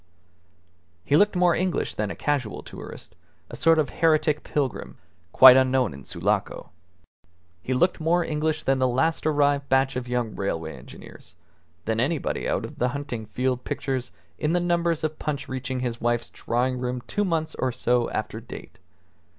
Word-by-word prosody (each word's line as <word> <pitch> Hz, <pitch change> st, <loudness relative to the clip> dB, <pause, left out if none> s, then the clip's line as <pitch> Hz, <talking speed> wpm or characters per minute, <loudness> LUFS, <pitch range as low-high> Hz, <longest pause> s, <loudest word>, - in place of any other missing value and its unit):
He 140 Hz, -, +3 dB
looked 205 Hz, +5 st, +4 dB
more 180 Hz, -1 st, +4 dB
English 185 Hz, -1 st, -1 dB
than 105 Hz, -1 st, -2 dB
a -, -, -5 dB
casual 140 Hz, -7 st, -2 dB
tourist, -, -, -10 dB, 0.4 s
a -, -, -6 dB
sort 165 Hz, 0 st, +4 dB
of 155 Hz, -2 st, +1 dB
heretic 155 Hz, -2 st, +2 dB
pilgrim, 140 Hz, -4 st, -2 dB
however, 85 Hz, 0 st, -37 dB
quite 130 Hz, +5 st, +10 dB
unknown 130 Hz, -, +2 dB
in 70 Hz, -1 st, -11 dB
Sulaco. -, -, -2 dB, 0.9 s
He 130 Hz, +8 st, -2 dB
looked 175 Hz, +8 st, +2 dB
more 165 Hz, +2 st, +2 dB
English 155 Hz, 0 st, -1 dB
than 135 Hz, 0 st, +1 dB
the 130 Hz, -, +3 dB
last 155 Hz, +6 st, 0 dB
arrived 145 Hz, -2 st, +2 dB
batch 135 Hz, 0 st, +2 dB
of 125 Hz, -1 st, -4 dB
young 120 Hz, -3 st, -2 dB
railway 80 Hz, -5 st, -3 dB
engineers, 65 Hz, +6 st, -13 dB, 0.5 s
than 110 Hz, 0 st, 0 dB
anybody 145 Hz, +5 st, -1 dB
out -, -, -1 dB
of -, -, -11 dB
the 125 Hz, -, +2 dB
hunting 125 Hz, -5 st, -5 dB
field 125 Hz, +3 st, -1 dB
pictures 130 Hz, -6 st, -3 dB, 0.3 s
in 150 Hz, +2 st, 0 dB
the 175 Hz, -, +3 dB
numbers 170 Hz, -2 st, 0 dB
of 155 Hz, 0 st, -2 dB
Punch 145 Hz, -2 st, -3 dB
reaching 130 Hz, 0 st, -4 dB
his 120 Hz, -2 st, -3 dB
wife's 120 Hz, 0 st, 0 dB
drawing 125 Hz, +2 st, -1 dB
room 125 Hz, 0 st, -3 dB
two 205 Hz, -, -1 dB
months 160 Hz, -4 st, -1 dB
or 130 Hz, -, -1 dB
so 120 Hz, -1 st, +1 dB
after -, -, -4 dB
date. -, -, -11 dB
130 Hz, 170 wpm, -25 LUFS, 125-155 Hz, 0.9 s, quite